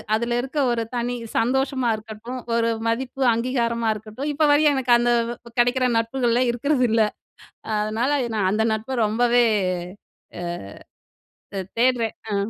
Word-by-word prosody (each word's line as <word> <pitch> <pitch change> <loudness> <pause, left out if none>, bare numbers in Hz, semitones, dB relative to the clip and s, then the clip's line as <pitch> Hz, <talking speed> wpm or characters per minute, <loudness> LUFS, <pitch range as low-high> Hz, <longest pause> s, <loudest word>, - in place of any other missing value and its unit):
அதில 235 +1 -1
இருக்க 270 +3 -4
ஒரு 230 -1 0
தனி 245 +1 -1 0.2
சந்தோஷமா 260 +1 +1
இருக்கட்டும், 220 +4 -8 0.2
ஒரு 230 0 +2 0.2
மதிப்பு, 260 +3 -1
அங்கீகாரமா 235 -1 0
இருக்கட்டும், 220 +7 -6
இப்போ 300 +1 +2
வரையும், 295 0 +4
எனக்கு 250 -2 +2
அந்த 240 0 +2 0.2
வ - - -5 0.2
கெடைக்கிற 250 +1 +3
நட்புகள 240 +1 +1
இருக்கிறதில்லை. 240 -4 +2 0.7
அதனால 220 +6 0 0.3
நான் 195 -3 +1
அந்த 220 +1 +1
நட்ப 235 +3 -3
ரொம்பவே, 240 +2 +3 1.0
அ - - -5 1.1
தே 195 - -1 0.2
தேடுறேன். 240 -2 +2 0.2
ஆ. - - +1
240 Hz, 130 wpm, -23 LUFS, 225-255 Hz, 1.1 s, வரையும்